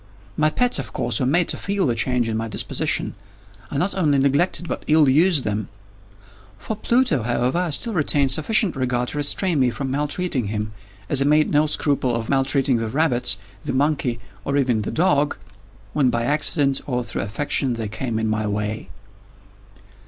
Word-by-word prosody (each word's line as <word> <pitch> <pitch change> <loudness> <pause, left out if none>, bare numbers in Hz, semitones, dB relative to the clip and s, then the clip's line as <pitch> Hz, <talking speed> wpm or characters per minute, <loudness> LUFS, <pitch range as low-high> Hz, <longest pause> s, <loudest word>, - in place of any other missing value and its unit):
My 155 +5 +3
pets, 245 +2 +1
of 110 -7 -6
course, 120 -2 -1
were 130 - 0
made 165 +5 +2
to - - +2
feel 200 -1 -1
the 125 - +1
change 120 +1 0
in 110 - -2
my 115 +1 -2
disposition. - - -1 0.6
I 140 - -4
not 180 +7 +1
only 155 -7 +2
neglected, 145 +6 +1
but - - -4
ill 155 -1 +4
used 155 +2 +4
them. 105 -1 -3 0.9
For 220 - -5
Pluto, 235 - +1
however, 125 +6 0
I 180 -1 -1
still 225 +10 +2
retained 145 -5 +2
sufficient 185 - +2
regard 125 -2 -1
to 150 - -4
restrain 160 +2 +1
me 130 -2 +3
from 135 +2 -4
maltreating 145 -1 -1
him, 105 0 -4 0.3
as 140 - +2
I - - +2
made 150 +1 +3
no 150 +1 +3
scruple 140 -5 +1
of 115 -1 -4
maltreating 135 -1 +3
the 115 -1 -3
rabbits, 125 -7 +1 0.2
the - - -4
monkey, 135 -3 0 0.2
or 140 - -1
even 125 -5 +1
the 105 - -3
dog, 150 -4 +1 0.6
when 140 -4 +2
by 115 -1 -1
accident, 145 0 +1
or 125 -3 -1
through - - -4
affection, 135 +3 -2
they 115 -2 -4
came 115 +2 -4
in 110 0 -1
my 110 0 -1
way. 105 +1 -3
135 Hz, 180 wpm, -22 LUFS, 120-155 Hz, 0.9 s, ill